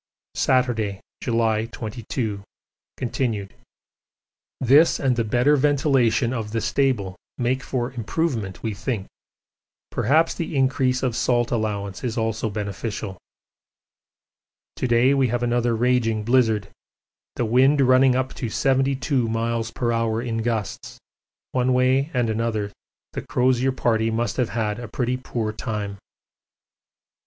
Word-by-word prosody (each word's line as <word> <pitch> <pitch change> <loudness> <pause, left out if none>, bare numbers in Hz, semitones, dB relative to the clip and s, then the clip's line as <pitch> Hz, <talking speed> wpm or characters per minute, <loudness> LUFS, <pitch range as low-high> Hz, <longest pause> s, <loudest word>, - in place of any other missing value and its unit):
Saturday, 115 -6 +1 0.2
July 115 -2 +1
22, 110 -2 -4 0.6
continued. 115 -5 -2 1.1
This 140 +6 +5
and 130 -3 +2
the 120 - +1
better 125 +7 +3
ventilation 135 -4 +2
of 110 -3 -4
the 115 - +1
stable 115 -8 0 0.2
make 130 +1 0
for 125 -1 -2
improvement 115 - -2
we 110 -2 -1
think 105 -1 -3 0.9
perhaps 155 +8 +2
the 165 -2 -4
increase 130 -1 +1
of 125 -3 0
salt 120 0 +1
allowance 105 -4 -2
is 120 -1 -2
also 110 0 -1
beneficial. 105 -1 -4 1.6
To - - -1
day 120 +3 +4
we 135 -2 +3
have 120 +1 -1
another 120 -1 +1
raging 115 -2 +1
blizzard 110 -4 +2 0.7
the 120 - 0
wind 130 +6 +4
running 130 -1 +5
up 130 0 -1
to 120 - -4
72 135 0 +1
m.p.h. 115 0 -1 0.6
in 115 -1 -2
gusts 115 -3 -3 0.5
one 130 0 +1
way 130 +3 +3
and 125 -3 +1
another 110 -2 -1 0.4
the - - -3
Crozier 130 +1 +1
Party 115 -3 +1
must 115 +1 -1
have 125 -3 +1
had 110 -2 -2
a 120 - -6
pretty 125 +3 -1
poor 115 -4 -3
time. 105 -3 -4
120 Hz, 125 wpm, -23 LUFS, 110-130 Hz, 1.6 s, This